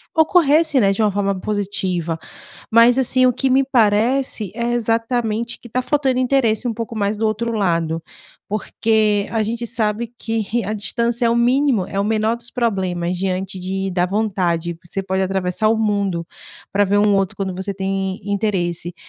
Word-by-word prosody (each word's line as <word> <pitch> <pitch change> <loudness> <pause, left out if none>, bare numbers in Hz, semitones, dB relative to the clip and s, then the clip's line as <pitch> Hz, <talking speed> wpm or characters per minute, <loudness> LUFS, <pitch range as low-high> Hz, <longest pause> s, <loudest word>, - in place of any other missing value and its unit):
ocorresse, 315 -2 +4
né, 195 -1 +4
de 195 - -1
uma 210 -2 +3
forma 200 -1 -1
positiva, 185 -5 -2 0.5
mas, 230 +2 +6
assim, 255 0 +3
o 250 - +4
que 265 +2 -1
me 270 +1 +4
parece, 230 -2 +1
é 235 0 -1
exatamente 230 0 -1
que 240 - -12
tá 255 +3 -1
faltando 265 -1 +1
interesse 250 -3 +1
um 225 - -2
pouco 230 0 -5
mais 205 0 0
do 220 - 0
outro 225 +2 -1
lado, 165 -6 0 0.5
porque 215 0 +1
a 225 - 0
gente 235 +2 -3
sabe 230 0 -2
que 225 -1 -2 0.2
a 215 - -2
distância 235 +3 0
é 230 - +3
o - - +2
mínimo, 245 -4 +2
é 195 - -4
o 200 - +1
menor 220 +1 +1
dos 235 0 -8
problemas, 185 -7 -1
diante 190 0 -2
de 190 +1 -3
da 180 -1 +1
vontade, 180 -5 -1
você 195 +3 -4
pode 190 0 -1
atravessar 190 +2 0
o 225 - +2
mundo 200 -6 0 0.5
pra 205 +1 +3
ver 205 +1 +2
um 205 0 +4
outro, 195 +2 0
quando 190 -2 -3
você 190 +2 -4
tem 195 0 -2
interesse. 175 -4 -1
210 Hz, 175 wpm, -20 LUFS, 190-235 Hz, 0.5 s, mas